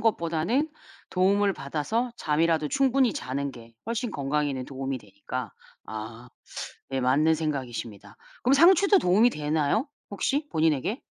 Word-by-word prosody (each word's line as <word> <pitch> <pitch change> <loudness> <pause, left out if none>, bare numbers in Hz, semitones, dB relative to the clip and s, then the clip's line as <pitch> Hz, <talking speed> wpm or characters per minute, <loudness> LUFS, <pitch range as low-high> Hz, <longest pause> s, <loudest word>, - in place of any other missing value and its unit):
것보다는 215 - +1 0.4
도움을 200 +2 +3
받아서 165 - -2
잠이라도 155 -1 +1
충분히 265 - +3
자는 140 +2 -3
게 115 -1 -13
훨씬 235 +1 -2
건강에는 140 -3 -1
도움이 135 0 -4
되니까 105 +2 -7 0.3
아 110 +3 -7 0.6
예 135 - 0
맞는 145 +6 +3
생각이십니다. 120 -9 -5 0.3
그럼 255 - +4
상추도 375 +7 +6
도움이 205 +7 +4
되나요, 150 - 0 0.2
혹시 280 +9 -1
본인에게? 160 - +1
155 Hz, 320 characters per minute, -27 LUFS, -, 0.6 s, 상추도